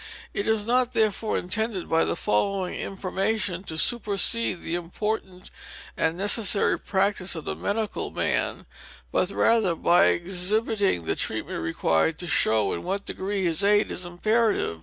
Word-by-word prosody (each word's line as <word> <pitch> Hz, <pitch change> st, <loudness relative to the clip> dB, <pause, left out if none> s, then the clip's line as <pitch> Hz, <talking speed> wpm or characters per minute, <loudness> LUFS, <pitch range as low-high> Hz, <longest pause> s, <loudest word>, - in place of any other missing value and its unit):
It 200 Hz, -, -2 dB
is 220 Hz, -2 st, +1 dB
not, 250 Hz, +1 st, +1 dB
therefore, 215 Hz, 0 st, 0 dB
intended 205 Hz, +1 st, -2 dB
by 165 Hz, 0 st, +2 dB
the -, -, -1 dB
following 185 Hz, -, 0 dB
information 195 Hz, 0 st, -2 dB
to 160 Hz, -, -4 dB
supersede 215 Hz, -2 st, +2 dB
fhe 165 Hz, -, -4 dB
important 185 Hz, +2 st, -4 dB, 0.4 s
and 160 Hz, +1 st, 0 dB
necessary 205 Hz, +1 st, +2 dB
practice 190 Hz, -1 st, 0 dB
of 160 Hz, -, -7 dB
the -, -, -3 dB
medical 215 Hz, +1 st, -2 dB
man; -, -, -1 dB, 0.5 s
but 180 Hz, -, +1 dB
rather, 205 Hz, -3 st, +2 dB
by 175 Hz, +2 st, +4 dB
exhibiting 190 Hz, -, 0 dB
the -, -, -1 dB
treatment -, -, -2 dB
required, 80 Hz, -, +1 dB
to 180 Hz, -, -3 dB
show 110 Hz, -, +2 dB
in 85 Hz, -, -4 dB
what 195 Hz, -, -3 dB
degree 195 Hz, 0 st, -3 dB
his 170 Hz, +3 st, +1 dB
aid 205 Hz, +1 st, +3 dB
is 185 Hz, -, -3 dB
imperative. 205 Hz, -, 0 dB
195 Hz, 145 wpm, -25 LUFS, 175-215 Hz, 0.5 s, by